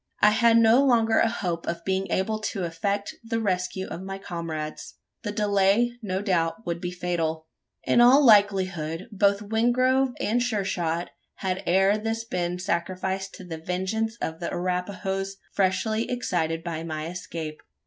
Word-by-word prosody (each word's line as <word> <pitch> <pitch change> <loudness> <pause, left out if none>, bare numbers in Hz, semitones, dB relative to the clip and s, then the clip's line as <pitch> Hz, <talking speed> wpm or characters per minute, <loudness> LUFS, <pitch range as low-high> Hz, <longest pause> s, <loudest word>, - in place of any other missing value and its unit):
I 210 - +6
had 230 +1 +5
no 230 +4 +6
longer 230 -4 +4
a 230 - +4
hope 175 -6 -3
of 170 0 -3
being 190 0 -1
able 215 +5 0
to 210 -3 -3
effect 200 +5 -2
the 230 0 -2
rescue 190 -2 -1
of 175 - -7
my 195 0 -5
comrades. 165 -4 -6 0.3
The 205 - -3
delay, 205 +2 +2
no 190 -2 -2
doubt, 180 +1 0
would 170 0 -3
be 180 - -2
fatal. 170 -3 -2 0.4
In 240 - +4
all 265 +4 +7
likelihood, 190 -6 +3
both 200 0 +2
Wingrove 255 +4 +2
and 235 +4 +1
Sure 220 -5 0
shot 170 -2 -2 0.2
had 190 -1 -2
ere 195 +4 +4
this 225 +1 -2
been 180 -5 -2
sacrificed 190 +1 -2
to - - -10
the 165 -3 -7
vengeance 190 +7 -2
of 160 0 -4
the 170 - -3
Arapahoes, 190 +2 -2 0.2
freshly 215 +4 +1
excited 165 -9 -1
by 165 -2 -4
my 155 -2 -4
escape. 165 -2 -6
190 Hz, 160 wpm, -26 LUFS, 175-220 Hz, 0.4 s, all